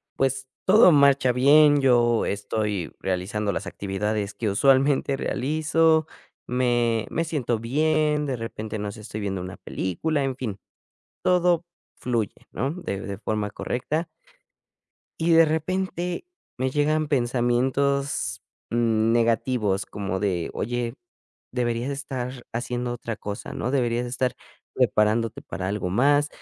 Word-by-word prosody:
pues 135 0 0 0.2
todo 195 -1 +7
marcha 140 -3 +5
bien, 145 +3 +6
yo 120 -3 +3
estoy 100 -2 -2
realizando 95 +3 -1
las 100 - -4
actividades 100 +2 -2
que 110 -3 -1
usualmente 135 +4 +3
realizo, 155 +3 +2 0.4
me 120 -2 +1
me 165 - -1
siento 140 -8 -1
bien, 150 +4 +1
de 130 - -1
repente, 110 -1 -5
no 105 0 -3
sé, 105 - -11
estoy 110 0 -6
viendo 95 -2 -2
una 90 +1 -7
película, 140 - -2
en 135 -2 -1
fin, 110 -7 -5 0.6
todo 175 -2 +3 0.3
fluye, 115 -5 -1 0.2
¿no?, 135 +8 -1
de 130 - -5
de 100 -1 -6
forma 105 -1 -2
correcta 155 - -3 1.1
y 165 +1 +2
de 165 0 +8
repente 180 - -2 0.3
me 130 +1 0
llegan 155 +2 +1
pensamientos 130 -3 0 0.3
negativos 115 -2 +1
como 95 -2 -4
de: 90 -5 -1
"Oye, 120 +1 -2 0.6
deberías 120 +1 -1
estar 130 -3 -5
haciendo 120 +1 -2
otra 115 -2 -5
cosa 105 -1 -6
¿no?, 125 - -2
deberías 120 -3 0
estar 125 0 -1 0.4
preparándote 110 +1 +2
para 95 - -4
algo 100 -3 -2
más, 145 +8 +3
120 Hz, 125 wpm, -25 LUFS, 105-140 Hz, 1.1 s, de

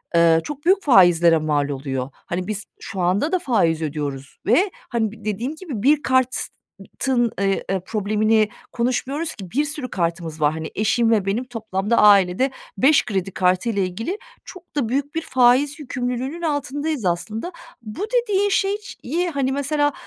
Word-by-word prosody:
eee, 165 -1 +5
çok 295 0 -7
büyük 385 +2 +4
faizlere 175 - +6
mal 150 -2 0
oluyor. 135 -2 -3
Hani, 180 +1 -5
biz 210 -1 -3 0.2
şu 195 -4 -7
anda 190 - +1
da 370 - +2
faiz 200 - +1
ödüyoruz 145 -3 -4
ve, 360 - +3 0.2
hani, 225 -4 0
b 220 -2 -14
dediğim 230 +8 -2
gibi 300 - -6
bir 290 +2 +4
kartın, 255 -1 -1
eee, 195 -1 +1
eee, 195 0 +1
problemini 215 +1 +1 0.2
konuşmuyoruz 265 +6 -2
ki, 190 -5 -10
bir 290 +4 +1
sürü 295 -4 -4
kartımız 170 -3 -3
var. 150 0 +3
Hani, 160 0 -6
eşim 225 +2 +2
ve 210 -4 +2
benim 205 +6 0
toplamda 220 -2 -2
ailede 205 +4 +5 0.3
5 280 +3 +4
kredi 195 -2 -2
kartıyla 190 +4 +1
ilgili 225 - -3 0.3
çok 365 -4 -13
da 260 -7 0
büyük 280 +4 -2
bir 325 - 0
faiz 260 +2 +3
yükümlülüğünün 255 +3 -3
altındayız 290 - -2
aslında. 215 - -2 0.3
Bu 225 - -8
dediğin 410 -5 +2
şey 395 +1 +1
ş 420 - -11
ye, 345 +7 -1
hani, 275 -4 -1
mesela 290 +1 0
230 Hz, 160 wpm, -22 LUFS, 185-285 Hz, 0.3 s, faizlere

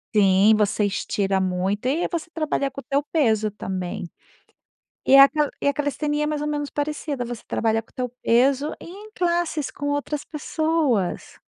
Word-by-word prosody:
Sim, 200 +1 +5
você 210 0 +1
estira 195 -1 -1
muito 185 +4 -1
e 305 +7 +1
você 340 -1 -4
trabalha 295 -4 -1
com 275 - -8
o - - -9
teu 280 0 0
peso 220 -9 +1
também. 190 -1 -5 1.0
E 270 - +7
a 275 0 +10
ca 300 0 0
e - - +3
a - - +3
calistenia 295 +1 -1
é - - -1
mais 300 -1 -2
ou 300 - -2
menos 290 -1 -2
parecida. 290 -3 -3
Você 240 -1 -6
trabalha 225 -1 0
com 225 - -22
o - - -31
teu 250 -1 -2
peso 270 +5 +2
e - - -10
em 405 +5 -11
classes 345 - -1
com 285 - -6
outras 290 +1 -2
pessoas. 300 - -1
275 Hz, 180 wpm, -23 LUFS, 215-300 Hz, 1.0 s, a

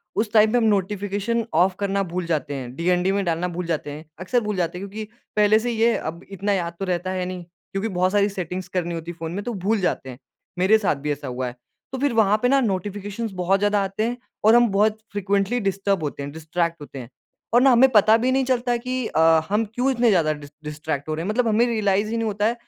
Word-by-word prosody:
उस 215 0 0
टाइम 215 -1 +5
पे 245 - +3
हम 240 - +2
नोटिफ़िकेशन 205 +2 0
ऑफ 180 +3 +3
करना 200 -1 0
भूल 180 0 -2
जाते 155 -3 -2
हैं। 125 -2 -7
डीएनडी 180 +3 +1
में 200 0 0
डालना 170 +1 0
भूल 180 0 -3
जाते 155 -3 -2
हैं, 150 +2 -9
अक्सर 215 +7 +1
भूल 210 -2 -2
जाते 180 -1 -1
हैं 200 - -6
क्योंकि 215 +1 -7 0.3
पहले 210 +1 +5
से 240 +2 -2
ये 230 0 +2
अब 170 +3 -6
इतना 200 +1 -1
याद 170 -3 -2
तो 195 - -2
रहता 180 0 -2
है 185 -1 -2
नहीं 180 -1 -6
क्योंकि 195 +5 -6
बहुत 185 -1 +1
सारी 205 0 +3
सेटिंग्स 185 -1 -5
करनी 175 -1 -1
होती 165 +1 -5
है 170 - -13
फ़ोन 165 0 -4
में 200 +3 -4
तो 240 - -4
भूल 215 +2 +2
जाते 135 -6 -1
हैं। 125 0 -10 0.4
मेरे 195 +4 +5
साथ 200 -8 0
भी 150 - +1
ऐसा 145 -1 -4
हुआ 125 0 -3
है। 120 - -7 0.4
तो 265 - -4
फिर 280 -2 +1
वहाँ 215 -2 +4
पे 245 - +4
नोटिफ़िकेशंस 205 +1 -3
बहुत 190 +2 +2
ज़्यादा 205 0 +2
आते 195 +2 -2
हैं 245 +1 -3 0.3
और 220 +2 +7
हम 240 0 +6
बहुत 210 +2 +2
फ्रीक्वेंटली 200 +3 0
डिस्टर्ब 195 -3 0
होते 145 -1 -4
हैं, 140 - -6
डिस्ट्रैक्ट 165 +1 -2
होते 140 -2 -9
हैं। 120 -2 -9 0.4
और 240 - +6
ना 270 0 +6
हमें 255 +2 +6
पता 215 -1 +6
भी 250 +3 +1
नहीं 265 0 +2
चलता 245 -1 +1
कि 255 +1 -3
अ, - - -1 0.3
हम 210 +3 +1
क्यों 255 +2 +2
इतने 240 -2 +2
ज़्यादा 165 -7 +3
डिस्ट्रैक्ट 150 0 -6
हो - - 0
रहे 160 - -4
हैं? - - -3
मतलब 235 +2 +1
हमें 225 +2 +3
रियलाइज़ 210 -2 +1
ही 230 - -2
नहीं 225 -1 -1
होता 205 0 -1
है 225 - +2
195 Hz, 245 wpm, -23 LUFS, 170-220 Hz, 0.4 s, और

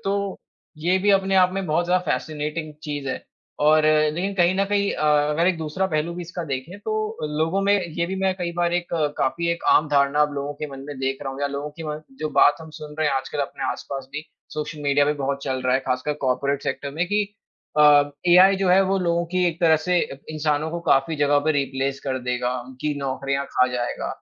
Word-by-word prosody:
तो 200 0 -1 0.4
ये 180 +4 +2
भी 205 +2 +2
अपने 195 0 +3
आप 185 0 +5
में 195 0 -2
बहुत 160 +3 +1
ज़्यादा 180 0 +2
फ़ैसिनेटिंग 155 0 -3
चीज़ 145 -3 -4
है। - - -4 0.4
और 155 +1 +5
अ, 155 0 +4
लेकिन 190 +5 -2
कहीं 180 -1 +3
न 195 - +2
कहीं 200 0 +1
अ, - - -2 0.3
अगर 165 +3 +1
एक 185 -2 +2
दूसरा 160 +4 -1
पहलू 160 0 -1
भी 175 - -5
इसका 175 0 -6
देखें 140 +6 -5
तो 215 - -1 0.4
लोगों 165 +5 +1
में 200 +1 +3 0.2
ये 170 0 0
भी 190 - -3
मैं 190 -1 +1
कई 175 -2 -4
बार 175 0 +1
एक 175 0 -1 0.3
काफ़ी 170 +6 0
एक 170 - -7
आम 150 - +4
धारणा 145 +1 +3
लोगों 140 +1 -3
के 150 - -5
मन 135 -1 -8
में 145 - -6
देख 135 0 -1
रहा 135 - -4
हूँ 135 - -8
या 145 - +1
लोगों 140 +1 -4
की - - -5
म 150 0 -4 0.2
जो 155 - -1
बात 145 0 +6
हम 160 - -10
सुन 150 0 -8
रहे 155 - +2
हैं - - 0
आजकल 135 +2 -4
अपने 140 - -4
आस-पास 135 -1 -7
भी, 150 +2 -5 0.3
सोशल 150 0 -5
मीडिया 145 0 +3
में 150 0 0
बहुत 140 0 -2
चल 130 -1 -2
रहा 130 0 +2
है। 135 - +2
ख़ासकर 130 +4 0
कॉर्पोरेट 140 +2 0
सेक्टर 140 - -3
में 165 +5 -1
कि 205 +2 +1 0.6
अ, 145 -1 +6 0.2
एआई 185 +3 +7
जो 190 -1 0
है 185 +2 +6
वो 195 - +2
लोगों 170 -1 +1
की 185 0 +3
एक 170 +2 -6
तरह 160 -2 +5
से 180 +2 +1 0.3
इंसानों 155 0 0
को 170 +1 -4
काफ़ी 135 +4 +3
जगह 145 0 +3
पे 155 - +4
रिप्लेस 135 -1 -1
कर 130 -1 -1
देगा, 125 0 -1
उनकी 130 +3 -4
नौकरियाँ 135 0 -2
खा 125 - +3
जाएगा। 120 -1 -2
155 Hz, 230 wpm, -23 LUFS, 140-175 Hz, 0.6 s, एआई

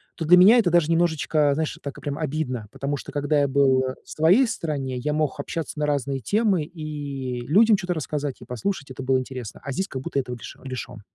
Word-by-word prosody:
то 165 - -4
для 180 +3 +7
меня 215 +7 +8
это 190 - +3
даже 170 -2 +3
немножечко, 160 -3 +2
знаешь, 160 0 -2
так, 140 - -7
прям 145 0 -4
обидно. 135 -8 -3
Потому 140 +1 -3
что, - - -9
когда 145 +1 +1
я 140 - +3
был 135 -1 +3 0.2
в - - -19
своей 180 +12 +4
стране, 140 - -3
я 150 +4 -2
мог 150 -3 -1
общаться 160 -2 -4
на 150 - 0
разные 140 -1 -1
темы 200 - +1
и 145 -6 -5
людям 210 +6 +5
чё-то 180 -2 -2
рассказать, 145 -3 -3
и - - -10
послушать. 140 - -4
Это 130 - -7
было 130 0 +2
интересно. 130 -4 -6
А 140 - -4
здесь 190 +9 -2
как 130 -1 -6
будто - - -1
этого 125 -2 -4
лиш 120 - -9
лишен. 125 -4 -6
145 Hz, 215 wpm, -24 LUFS, 135-165 Hz, 0.2 s, меня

